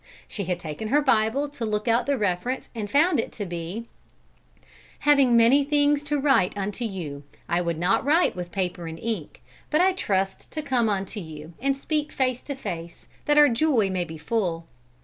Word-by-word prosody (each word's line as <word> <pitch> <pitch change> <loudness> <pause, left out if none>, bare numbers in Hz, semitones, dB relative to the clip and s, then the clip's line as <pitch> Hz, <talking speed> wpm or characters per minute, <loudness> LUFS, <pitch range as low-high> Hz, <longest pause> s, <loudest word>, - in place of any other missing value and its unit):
She 200 - -4
had 180 0 -2
taken 160 +6 -5
her 280 +7 +3
Bible 260 0 +2
to 275 -4 -7
look 215 0 -1
out 235 +2 +2
the 280 -1 +1
reference 205 +5 -2
and 215 -4 -4
found 315 - +3
it - - -2
to 205 - -5
be: 175 +5 -5 1.2
"Having 275 -5 +5
many 245 +5 +5
things 290 0 +2
to 295 0 0
write 270 -10 +2
unto 205 +4 -3
you, 165 -10 -5 0.2
I 170 +1 +1
would 170 -2 -2
not 175 +2 +2
write 310 +6 +3
with 175 -1 -6
paper 180 -2 -3
and 165 0 -6
ink; 210 -5 -5 0.3
but 305 - +2
I 375 +1 +4
trust 195 - -1
to 310 - -3
come 250 -5 +1
unto 195 +1 -2
you, 160 -2 -9
and 275 +1 +1
speak 300 +1 -2
face 255 -2 0
to 280 - -4
face, 170 -9 -7 0.2
that 295 0 +3
our 295 0 +8
joy 235 -5 +2
may 185 -1 0
be 160 -1 -8
full." 170 -2 -2
220 Hz, 190 wpm, -25 LUFS, 180-280 Hz, 1.2 s, our